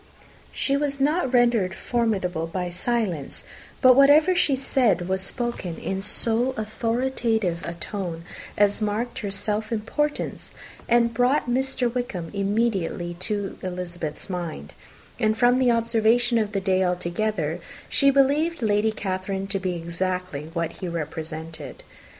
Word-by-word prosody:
She 275 - 0
was 280 -1 -1
not 290 0 +1
rendered 235 -7 +3
formidable 190 -9 -1
by 180 +1 -3
silence: 180 - -2 0.4
but 255 -1 +8
whatever 290 +6 +6
she 285 -5 +3
said 245 -9 +1
was 190 0 0
spoken 195 -5 -3
in 190 0 -3
so 230 +5 +2
authoritative 225 -4 -1
a 170 - -4
tone 170 -2 -5 0.3
as 205 +1 +4
marked 215 +3 -2
her 205 - -3
self 210 +3 -2
importance, 295 +7 -2 0.3
and 235 0 +4
brought 250 +4 +2
Mr. 260 0 +1
Wickham 190 -10 -3
immediately 200 -4 0
to 205 0 -3
Elizabeth's 175 -4 -5
mind; 170 - -5 0.5
and, 220 0 +2
from 245 +1 +4
the 255 -1 +4
observation 230 +1 +3
of 215 -1 -2
the 195 - 0
day 190 -1 +2
altogether, 180 -1 -1 0.3
she 275 - +3
believed 280 +3 +2
Lady 210 0 +2
Catherine 190 -1 -3
to 195 0 -2
be 185 -1 -2
exactly 170 -2 -3
what 165 -1 -1
he 180 - -7
had 170 - -4
represented. 160 0 -6
210 Hz, 135 wpm, -24 LUFS, 180-245 Hz, 0.5 s, but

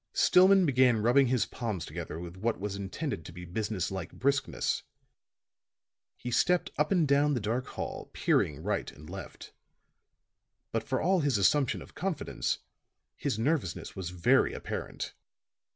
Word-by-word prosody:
Stillman 190 +1 +6
began 130 -4 +4
rubbing 130 +3 +5
his 125 -1 +2
palms 110 -9 -4
together 80 0 -6
with 85 0 -7
what 110 +5 -1
was 100 0 -3
intended 100 - -4
to - - -9
be 90 +1 -9
business 100 0 -2
like 95 -3 -5
briskness; 140 +3 0 1.4
he 125 - -5
stepped 180 +8 +2
up 150 +4 +1
and 175 -6 +3
down 140 +1 +3
the - - 0
dark 115 +5 -2
hall, - - -5
peering 75 -3 +1
right - - -1
and 75 - -14
left. 95 +1 -9 1.2
But - - 0
for - - -1
all 185 +2 +3
his 140 -7 +2
assumption 130 +7 +2
of - - -16
confidence, 185 -4 -2 0.6
his - - -2
nervousness 115 - -1
was 95 -3 -4
very 90 -1 +3
apparent. - - -5
115 Hz, 150 wpm, -30 LUFS, 95-145 Hz, 1.4 s, Stillman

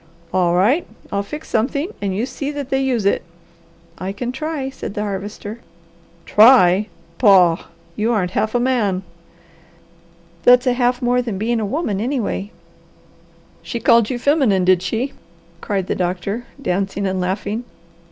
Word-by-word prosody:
"All 175 -2 +2
right 235 - +2 0.2
I'll 200 - 0
fix 300 +10 -8
something, 280 - 0
and 195 -2 -1
you 220 +5 0
see 275 +2 -5
that 285 -2 -5
they 270 0 +2
use 250 -6 0
it." 200 - +2 0.8
"I 185 +1 -3
can 240 +5 -4
try," 275 0 -4
said 220 - -7
the 210 - -2
Harvester. 205 +2 -5 0.7
"Try! 210 -4 +6 0.3
Pah! 185 -7 +5 0.3
You 220 +3 0
aren't 190 -6 0
half 215 +4 -1
a - - +3
man!" 225 -7 0 1.4
"That's 250 +1 +6
a 250 - +3
half 245 0 0
more 245 +1 +2
than 230 -6 -4
being 230 +3 0
a 215 - -2
woman, 215 - -2
anyway." 235 -5 -2 1.1
"She 235 - -5
called 230 -1 +4
you 255 - -2
feminine, 245 - +2
did 185 -1 +4
she?" 230 +9 -2 0.5
cried 195 -3 -2
the - - -1
doctor, 185 +6 -2
dancing 195 -3 -1
and 190 -1 -1
laughing. 205 +5 -2
220 Hz, 150 wpm, -19 LUFS, 195-250 Hz, 1.4 s, Try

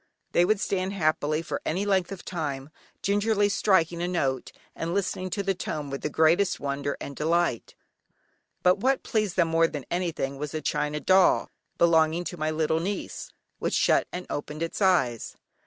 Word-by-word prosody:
They 175 - +4
would 210 +2 +2
stand 190 -1 -1
happily 155 -3 0
for - - -4
any 185 +6 -1
length 190 -2 +1
of 195 -2 -8
time, 150 -5 -4 0.3
gingerly 205 +1 +2
striking 175 -4 +2
a 175 - 0
note, 135 -8 -1 0.2
and 165 +2 -3
listening 185 -1 -1
to 200 +3 -2
the 195 0 +1
tone 150 -5 -5
with 140 - -4
the - - -2
greatest 165 +6 +3
wonder 140 0 -2
and 140 - -7
delight. 165 -5 0 0.9
But 180 +2 +4
what 265 +5 +1
pleased 215 -5 -1
them 170 -3 +3
more 165 0 +4
than 145 -5 -6
anything 165 -6 -2
was 150 +1 -4
a - - 0
china 150 +1 -1
doll, 190 +3 +4 0.3
belonging 165 0 +3
to 175 - -5
my 155 0 -1
little 155 0 +1
niece, 200 - -4 0.3
which - - -1
shut - - +3
and 180 0 -5
opened 150 +2 -4
its 165 - -4
eyes. 150 - +2
170 Hz, 175 wpm, -26 LUFS, 150-190 Hz, 0.9 s, They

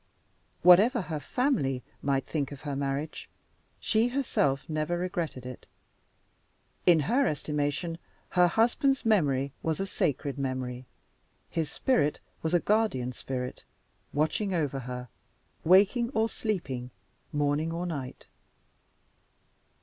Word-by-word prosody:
Whatever 205 +9 +7
her 155 -3 -4
family 145 - 0 0.2
might 135 -1 0
think 145 -4 -2
of 140 - -9
her 145 -2 -3
marriage, 140 +2 -3 0.5
she 225 +2 +2
herself 240 - 0
never 155 +2 -1
regretted 170 -7 -3
it. 125 -1 -9 1.2
In 170 -3 +7
her 250 - +2
estimation 150 +3 -1 0.3
her 180 -1 +5
husband's 245 - +2
memory 140 -11 +2
was 160 +1 -1
a 195 - 0
sacred 140 -6 -1
memory; 130 -2 -3 0.6
his 165 -3 -1
spirit 235 - +1 0.2
was 160 +2 +1
a - - +5
guardian 200 - +1
spirit, 125 0 -5 0.5
watching 170 +6 0
over 145 -5 0
her, 125 0 -6 0.6
waking 205 +7 +5
or 220 +1 +3
sleeping, 150 - -3 0.4
morning 145 +2 +1
or 170 +2 -3
night. 140 -7 -5
155 Hz, 115 wpm, -29 LUFS, 135-195 Hz, 1.2 s, Whatever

